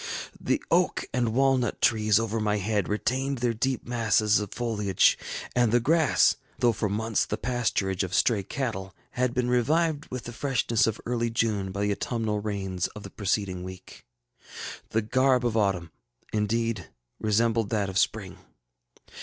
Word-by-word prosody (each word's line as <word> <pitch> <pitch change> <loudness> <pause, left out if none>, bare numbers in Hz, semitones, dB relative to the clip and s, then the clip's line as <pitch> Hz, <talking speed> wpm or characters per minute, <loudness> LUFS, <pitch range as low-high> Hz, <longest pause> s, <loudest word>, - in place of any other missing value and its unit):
The - - 0
oak - - +2
and 120 -2 +1
walnut 135 -3 +2
trees 110 -2 +3
over 115 0 -1
my 105 -1 +1
head 105 -1 -1
retained 130 +6 -1
their 120 -1 0
deep 130 +3 -1
masses 110 -3 +2
of 105 -2 -5
foliage, 105 -6 +2 0.4
and 120 -3 +3
the 120 - +4
grass, 155 +5 +3 0.2
though 120 - +3
for 110 -2 -2
months 110 +2 0
the 105 - -3
pasturage 115 -7 -1
of 95 0 -2
stray 105 0 +3
cattle, 95 -5 -4 0.2
had 125 0 0
been 125 -1 +1
revived 150 +5 +1
with 125 -1 -6
the 120 - -7
freshness 115 -3 +1
of 110 -1 -2
early 120 -1 0
June 110 -4 0
by 100 +2 -4
the 105 0 +1
autumnal 110 0 -1
rains 95 -4 -2
of 105 - -8
the - - -9
preceding 100 -2 -1
week. 95 0 -10 0.9
The 110 0 0
garb 130 +2 +2
of 115 -2 0
autumn, 95 -6 0 0.4
indeed, 110 -2 -1 0.3
resembled 110 0 +1
that 105 -3 0
of 95 -1 0
spring. - - -1
110 Hz, 160 wpm, -27 LUFS, 105-120 Hz, 0.9 s, the